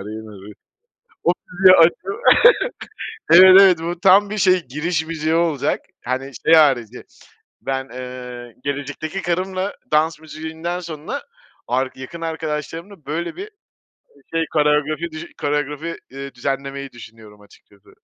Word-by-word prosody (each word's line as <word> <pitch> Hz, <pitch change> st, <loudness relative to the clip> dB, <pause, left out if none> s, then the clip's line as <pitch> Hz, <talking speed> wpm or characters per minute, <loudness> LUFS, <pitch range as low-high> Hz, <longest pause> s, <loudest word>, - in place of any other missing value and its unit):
rina 105 Hz, -1 st, -9 dB
ri. -, -, -10 dB, 0.7 s
O 175 Hz, -, +4 dB, 0.2 s
müziği 185 Hz, +1 st, +6 dB
açıp 165 Hz, 0 st, +6 dB, 1.4 s
Evet, 185 Hz, +2 st, +9 dB
evet, 185 Hz, -4 st, +6 dB
bu 170 Hz, +1 st, -4 dB
tam 195 Hz, +2 st, +5 dB
bir 215 Hz, -, -4 dB
şey 185 Hz, -2 st, +3 dB
giriş 160 Hz, +4 st, -2 dB
müziği 160 Hz, 0 st, -1 dB
olacak 165 Hz, -5 st, 0 dB, 0.2 s
hani, 130 Hz, +2 st, -3 dB
şey 165 Hz, -, +5 dB
harici. 125 Hz, -7 st, +3 dB, 0.6 s
Ben, 135 Hz, 0 st, -3 dB
eee, 125 Hz, -2 st, -8 dB
gelecekteki 145 Hz, +6 st, -4 dB
karımla 185 Hz, +3 st, -2 dB, 0.2 s
dans 155 Hz, +1 st, +2 dB
müziğinden 160 Hz, +2 st, -6 dB
sonra 160 Hz, -4 st, -6 dB, 0.5 s
ark 130 Hz, +3 st, -1 dB
yakın 130 Hz, +6 st, -9 dB
arkadaşlarımla 160 Hz, +2 st, -5 dB
böyle 170 Hz, +4 st, -4 dB
bir 400 Hz, +4 st, -7 dB, 0.8 s
şey 165 Hz, 0 st, +1 dB
koreografi 150 Hz, +2 st, +1 dB
düş 155 Hz, +1 st, -7 dB, 0.2 s
koreografi, 150 Hz, +3 st, -2 dB, 0.2 s
iii, 135 Hz, +1 st, -8 dB
düzenlemeyi 135 Hz, +1 st, -4 dB
düşünüyorum 110 Hz, -3 st, -14 dB
açıkçası. 100 Hz, -1 st, -22 dB
155 Hz, 125 wpm, -20 LUFS, 130-170 Hz, 1.4 s, Evet